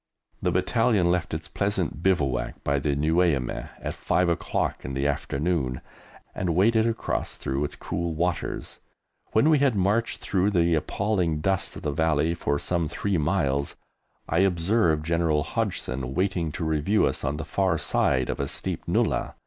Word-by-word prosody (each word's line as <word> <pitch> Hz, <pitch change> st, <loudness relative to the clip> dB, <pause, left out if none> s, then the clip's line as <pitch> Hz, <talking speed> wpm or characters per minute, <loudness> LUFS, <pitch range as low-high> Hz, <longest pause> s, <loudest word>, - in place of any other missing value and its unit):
The -, -, +1 dB
Battalion 95 Hz, 0 st, +2 dB
left 90 Hz, -1 st, -1 dB
its -, -, -4 dB
pleasant 100 Hz, -6 st, -1 dB
bivouac 75 Hz, -9 st, 0 dB
by 70 Hz, 0 st, +1 dB
the 70 Hz, 0 st, 0 dB
Nueiameh 75 Hz, -3 st, +1 dB
at -, -, -4 dB
5 90 Hz, -1 st, +1 dB
o'clock 85 Hz, -, -1 dB
in 70 Hz, -, -5 dB
the 70 Hz, +1 st, -1 dB
afternoon, 70 Hz, -1 st, -1 dB, 0.5 s
and 85 Hz, -3 st, -1 dB
waded 110 Hz, +4 st, +4 dB
across 110 Hz, -, -2 dB
through 65 Hz, +2 st, -2 dB
its 75 Hz, -, -4 dB
cool 85 Hz, -1 st, -3 dB
waters; 85 Hz, +1 st, -2 dB, 0.5 s
when 110 Hz, +7 st, +4 dB
we 155 Hz, -2 st, +5 dB
had 135 Hz, -5 st, +3 dB
marched 105 Hz, +4 st, +1 dB
through 95 Hz, +1 st, +1 dB
the 85 Hz, -4 st, +2 dB
appalling 85 Hz, 0 st, 0 dB
dust 95 Hz, +3 st, -1 dB
of -, -, -9 dB
the 75 Hz, -, 0 dB
Valley 80 Hz, +1 st, +1 dB
for 70 Hz, -4 st, -1 dB
some 85 Hz, +1 st, -1 dB
three 95 Hz, +1 st, -1 dB
miles, 70 Hz, -4 st, 0 dB, 0.5 s
I 85 Hz, -, +1 dB
observed 85 Hz, -3 st, +2 dB
General 85 Hz, -3 st, +1 dB
Hodgson 65 Hz, -2 st, -3 dB
waiting 90 Hz, -3 st, 0 dB
to 80 Hz, -, -3 dB
review 80 Hz, +7 st, +2 dB
us -, -, -2 dB
on 70 Hz, +2 st, -1 dB
the 80 Hz, -, -5 dB
far 95 Hz, -4 st, +1 dB
side 65 Hz, -4 st, +1 dB
of -, -, -5 dB
a 70 Hz, -, -1 dB
steep -, -, -4 dB
nullah. -, -, 0 dB
85 Hz, 165 wpm, -26 LUFS, 75-95 Hz, 0.5 s, we